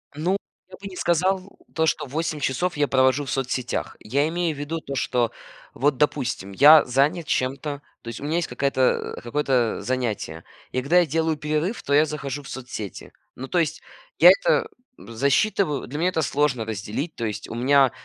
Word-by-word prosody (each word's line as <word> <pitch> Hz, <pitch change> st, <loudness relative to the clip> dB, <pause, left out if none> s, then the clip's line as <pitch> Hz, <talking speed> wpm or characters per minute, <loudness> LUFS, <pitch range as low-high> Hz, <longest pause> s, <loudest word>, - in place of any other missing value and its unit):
Ну, 180 Hz, +6 st, 0 dB, 0.3 s
я -, -, -11 dB
бы 200 Hz, -, -7 dB
не 185 Hz, -, -9 dB
сказал, 185 Hz, +3 st, +1 dB, 0.3 s
то 160 Hz, 0 st, +1 dB
что -, -, 0 dB
8 155 Hz, +2 st, -3 dB
часов 150 Hz, +6 st, -1 dB
я 145 Hz, -1 st, +2 dB
провожу 130 Hz, +1 st, +3 dB
в 125 Hz, -, -5 dB
соцсетях. 130 Hz, -1 st, -2 dB
Я 140 Hz, +7 st, 0 dB
имею 170 Hz, -2 st, -1 dB
в 140 Hz, -, -10 dB
виду 160 Hz, +3 st, -3 dB
то, 140 Hz, -3 st, -6 dB
что 120 Hz, -3 st, 0 dB, 0.4 s
вот, 145 Hz, 0 st, +1 dB
допустим, 125 Hz, -8 st, -1 dB
я 150 Hz, +9 st, +8 dB
занят 145 Hz, +7 st, +1 dB
чем-то, 140 Hz, +3 st, -2 dB, 0.2 s
то -, -, -15 dB
есть 115 Hz, -, -6 dB
у -, -, -9 dB
меня 155 Hz, +3 st, 0 dB
есть 170 Hz, -, -1 dB
какая-то, 130 Hz, 0 st, 0 dB
э, -, -, -7 dB
какое-то, 125 Hz, -1 st, 0 dB
э, -, -, -8 dB
занятие. 115 Hz, -10 st, -3 dB, 0.3 s
И 130 Hz, -, -1 dB
когда 170 Hz, +7 st, +4 dB
я 175 Hz, -, +4 dB
делаю 160 Hz, 0 st, 0 dB
перерыв, 155 Hz, +8 st, -2 dB
то 140 Hz, -, -1 dB
я 150 Hz, +2 st, +6 dB
захожу 145 Hz, -2 st, -5 dB
в -, -, -11 dB
соцсети. 120 Hz, -7 st, -7 dB, 0.2 s
Ну, 130 Hz, -, -7 dB
то 175 Hz, -, +1 dB
есть, 160 Hz, -3 st, -1 dB, 0.4 s
я -, -, +10 dB
это -, -, +2 dB, 0.3 s
засчитываю, 140 Hz, -, 0 dB
для 145 Hz, +5 st, -5 dB
меня 180 Hz, +2 st, +2 dB
это 160 Hz, -3 st, -1 dB
сложно 140 Hz, -7 st, 0 dB
разделить, 110 Hz, -, -4 dB
то 115 Hz, -, -5 dB
есть 105 Hz, -1 st, -4 dB
у -, -, -6 dB
меня 135 Hz, +2 st, +4 dB
140 Hz, 195 wpm, -24 LUFS, 125-160 Hz, 0.4 s, я